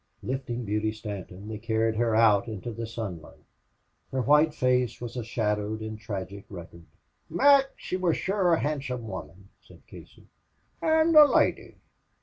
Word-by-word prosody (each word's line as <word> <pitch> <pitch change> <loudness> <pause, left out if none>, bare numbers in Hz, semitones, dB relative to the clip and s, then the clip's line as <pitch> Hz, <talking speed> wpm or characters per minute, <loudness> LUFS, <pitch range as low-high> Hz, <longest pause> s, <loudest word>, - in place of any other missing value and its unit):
Lifting 125 -2 -4
Beauty 105 +1 -1
Stanton, 100 -2 -8
they 110 -1 -6
carried 110 0 0
her 115 -1 +1
out 110 -1 +4
into 110 +1 -6
the 115 +1 -5
sunlight. 100 -8 -7 0.7
Her 130 -1 -1
white 150 +3 +4
face 125 -4 0
was 120 0 -7
a 120 - -3
shadowed 105 -1 -2
and 110 0 -6
tragic 100 -2 -6
record. 85 -3 -11 0.4
"Mac, 280 0 +5
she 185 - -4
wor 180 -2 +1
shure 190 +1 0
a - - -2
handsome 135 -5 -3
woman," 95 0 -9
said - - -19
Casey, - - -15 0.6
"an' 320 0 +3
a 305 -1 +11
loidy." - - +1
115 Hz, 150 wpm, -27 LUFS, 105-135 Hz, 0.7 s, a